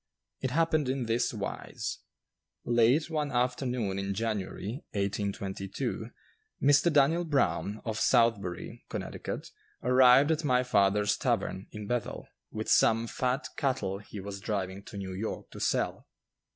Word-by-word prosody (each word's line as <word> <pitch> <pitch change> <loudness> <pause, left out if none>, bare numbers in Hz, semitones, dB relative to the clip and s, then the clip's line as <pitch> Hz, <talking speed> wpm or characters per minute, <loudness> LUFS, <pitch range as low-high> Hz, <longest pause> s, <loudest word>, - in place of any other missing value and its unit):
It 130 - -1
happened 155 0 +2
in 130 -1 0
this 115 +1 +1
wise: 105 -4 -4 0.7
Late 120 +6 +4
one 150 -3 -1
afternoon 125 -5 0
in 100 0 -2
January, 110 - -3
1822, 100 -1 -3 0.5
Mr. 145 +4 +4
Daniel 150 +4 +4
Brown, 105 - 0
of 110 -1 -2
Southbury, 115 -8 +1
Connecticut, - - -5 0.3
arrived 125 +3 +6
at 160 0 0
my 125 -3 +3
father's 105 -3 +3
tavern, 95 +2 -1
in 105 -1 -7
Bethel, 120 +1 -3 0.2
with - - -5
some 115 +1 +4
fat 125 +4 -1
cattle 105 -9 -1
he 105 0 -9
was 100 0 -6
driving 95 -2 -3
to - - -9
New 95 -1 -5
York 105 +4 -5
to - - -9
sell. - - 0
115 Hz, 130 wpm, -30 LUFS, 100-130 Hz, 0.7 s, arrived